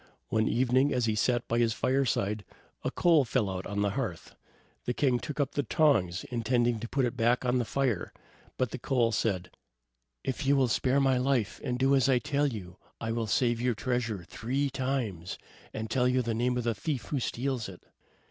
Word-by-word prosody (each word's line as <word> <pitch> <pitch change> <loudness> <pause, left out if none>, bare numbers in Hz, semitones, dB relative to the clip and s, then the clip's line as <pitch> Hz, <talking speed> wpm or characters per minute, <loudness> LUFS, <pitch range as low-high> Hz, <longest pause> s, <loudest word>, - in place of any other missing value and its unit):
One 110 0 +2
evening, 130 +3 +3
as 125 -2 +1
he 110 - +1
sat 120 +3 +1
by 115 - +1
his 115 -1 +3
fireside, 110 -6 0 0.4
a - - 0
coal 165 -4 +4
fell 120 -3 0
out 95 0 -4
on 100 0 -1
the 100 - +1
hearth. 110 -8 -4 0.5
The 125 - -1
king 130 -4 +2
took 150 +3 -6
up 140 -1 +1
the 145 - 0
tongs, 110 - +2
intending 120 0 +1
to 115 +1 -6
put 135 -2 +1
it 120 - -2
back 120 +1 +2
on 125 0 +2
the 120 - 0
fire, 125 -7 -1 0.5
but 125 -4 0
the 130 - -5
coal 120 -3 +1
said: 95 -6 -1 0.7
"If 130 +3 -2
you 140 - +5
will 130 -3 +3
spare 130 +4 +2
my 135 -2 +3
life, 125 -5 0
and 125 -1 -1
do 135 +2 +3
as 135 0 +3
I 130 - +5
tell 145 +4 +1
you, 95 -8 -6 0.2
I 115 -1 -2
will 115 -1 -1
save 120 +2 +1
your 125 -1 +1
treasure 115 -4 -2
three 130 +9 -2
times, 125 -10 -2 0.3
and 110 0 -4
tell 125 +2 +2
you 125 0 +2
the 115 -1 -1
name 125 +2 0
of 125 - -1
the 115 0 +1
thief 130 +5 -3
who 145 - 0
steals 125 -2 -2
it." 90 - -12
125 Hz, 205 wpm, -29 LUFS, 110-130 Hz, 0.7 s, you